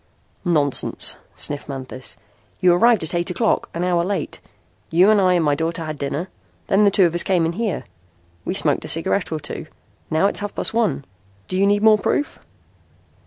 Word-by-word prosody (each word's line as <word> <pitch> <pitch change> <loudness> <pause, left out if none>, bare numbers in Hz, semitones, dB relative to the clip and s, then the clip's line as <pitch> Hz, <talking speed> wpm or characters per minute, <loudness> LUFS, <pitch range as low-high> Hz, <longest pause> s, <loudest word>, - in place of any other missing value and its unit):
"Nonsense," 150 -6 +2 0.2
sniffed 145 0 -2
Manthis. 130 -1 -6 0.4
"You 180 -1 +4
arrived 225 +2 +4
at 160 - 0
eight 175 +1 -1
o'clock 215 +5 0
an 170 - -3
hour 175 -1 +1
late. 200 +3 -3 0.5
You 180 +5 +5
and 210 -2 +4
I 185 -1 +3
and 170 -2 +1
my 145 - +3
daughter 165 +2 -2
had 155 -2 -6
dinner. 145 +5 -3 0.4
Then 205 +2 +3
the - - +6
two 195 -1 +4
of 170 - 0
us 175 - +3
came 180 -4 +1
in 165 - -1
here. 215 -1 -2 0.6
We - - -3
smoked - - +2
a - - -7
cigarette - - +1
or - - -2
two. - - -6 0.4
Now 160 +5 +2
it's 200 - +1
half 205 0 -5
past - - -2
one. 225 -11 0 0.4
Do 185 - -4
you 195 +1 +3
need 205 +1 +2
more 215 -1 +6
proof?" 290 - -1
175 Hz, 195 wpm, -21 LUFS, 160-200 Hz, 0.6 s, the